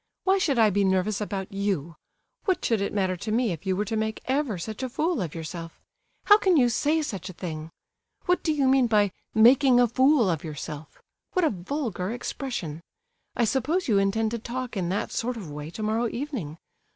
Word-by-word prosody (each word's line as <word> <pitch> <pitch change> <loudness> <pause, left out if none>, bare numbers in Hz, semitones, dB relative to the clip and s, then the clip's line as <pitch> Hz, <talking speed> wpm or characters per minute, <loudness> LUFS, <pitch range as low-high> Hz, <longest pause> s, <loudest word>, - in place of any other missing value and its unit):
"Why 385 +1 +3
should 290 -8 +1
I 220 -2 +5
be 200 +1 +2
nervous 190 +2 +1
about 195 -2 -4
you? 195 -6 -2 0.5
What 375 -4 +1
would 220 -3 +2
it 200 - -1
matter 190 -2 0
to 215 - -4
me 230 -1 +2
if 170 +3 -6
you 190 - +2
were 205 +3 -1
to 220 - -3
make 220 0 -1
ever 260 -6 0
such 215 +7 -6
a 260 - -2
fool 315 - 0
of 170 -4 -4
yourself? 165 +1 -7 0.5
How 415 0 +7
can 370 -5 +3
you 245 -3 +5
say 305 +6 +1
such 195 -8 -5
a - - -8
thing? 160 -3 -6 0.6
What 360 0 +2
do 320 - 0
you 285 -3 +2
mean 260 -1 +4
by 210 -3 +3 0.2
'making 245 +3 +6
a 245 - +5
fool 260 0 +4
of 165 -4 -1
yourself'? 155 -1 -8 0.3
What 365 -2 +2
a - - +2
vulgar 200 - -3
expression! 230 - -4 0.5
I 240 - +2
suppose 285 - 0
you 210 -5 +4
intend 215 +3 +1
to 235 - -3
talk 245 +2 -5
in 180 -3 -1
that 195 - -2
sort 245 +1 -2
of 180 -9 -7
way 150 +1 -6
tomorrow 220 +5 -1
evening? 235 - -5
220 Hz, 205 wpm, -26 LUFS, 185-260 Hz, 0.6 s, How